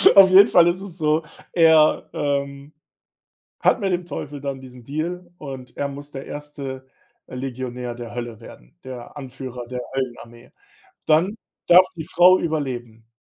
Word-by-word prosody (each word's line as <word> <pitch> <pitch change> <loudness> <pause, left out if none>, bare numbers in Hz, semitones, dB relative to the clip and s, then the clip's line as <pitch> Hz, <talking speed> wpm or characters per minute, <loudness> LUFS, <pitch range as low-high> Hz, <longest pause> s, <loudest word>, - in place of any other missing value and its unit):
Auf 195 -1 +9
jeden 195 +2 +8
Fall 175 -1 +5
ist 175 +2 0
es 190 -3 -9
so: 155 -1 +1 0.3
Er, 160 -2 +5
ähm, 140 0 -3 0.9
hat - - +3
mit 195 -2 0
dem 180 0 -1
Teufel 145 -4 -6
dann 140 -1 -4
diesen 125 -2 -13
Deal 170 +6 -4
und 135 -3 -9
er 140 - -1
muss 145 +1 -9
der 135 -1 -8
1., 140 -3 -7 0.4
äh, - - -11
Legionär 125 -1 -5
der 120 -1 -8
Hölle 120 -2 -6
werden, - - -15
der 130 +1 -9
Anführer 130 -3 -7
der 125 +1 -5
Höllenarmee. 120 -2 -6 0.5
Dann 165 +6 +3 0.3
darf 180 +1 +8
die 160 - -5
Frau 180 +3 +5
überleben. 120 -8 -4
140 Hz, 155 wpm, -22 LUFS, 125-165 Hz, 0.9 s, Auf